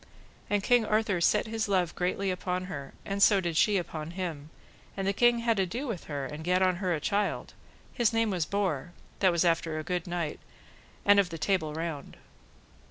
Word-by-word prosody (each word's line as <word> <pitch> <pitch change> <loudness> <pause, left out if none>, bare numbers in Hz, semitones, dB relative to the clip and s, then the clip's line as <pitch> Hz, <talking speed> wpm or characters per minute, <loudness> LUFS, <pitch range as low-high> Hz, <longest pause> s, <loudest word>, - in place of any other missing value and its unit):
And 205 -1 +1
King 245 0 +4
Arthur 215 -4 +1
set - - +3
his 225 -1 -2
love 185 -4 +1
greatly 185 +2 -1
upon 180 0 -2
her, 140 -7 -7
and 200 0 -3
so 200 -1 +6
did 170 -3 -2
she 205 +5 +4
upon 160 -3 -4
him, 160 -5 -4 0.5
and 195 - -2
the 200 - +2
king 240 +2 +3
had 230 -3 +2
ado 210 +9 -1
with 225 -10 -5
her, 145 -3 -4
and 150 +3 -7
gat 180 +2 +2
on 185 -1 +2
her 185 -1 -1
a - - -3
child: 200 +6 -1 0.4
his 240 -2 +2
name 225 -2 +1
was 175 -5 -1
Borre, 180 -6 -1 0.3
that 190 -2 +4
was 170 +1 +2
after 165 -1 +1
a 155 - -3
good 180 +1 -3
knight, 170 -3 -3 0.7
and 205 0 +7
of 195 -3 +2
the 165 - -6
Table 160 -3 0
Round. 160 -3 -5
185 Hz, 200 wpm, -29 LUFS, 165-205 Hz, 0.7 s, and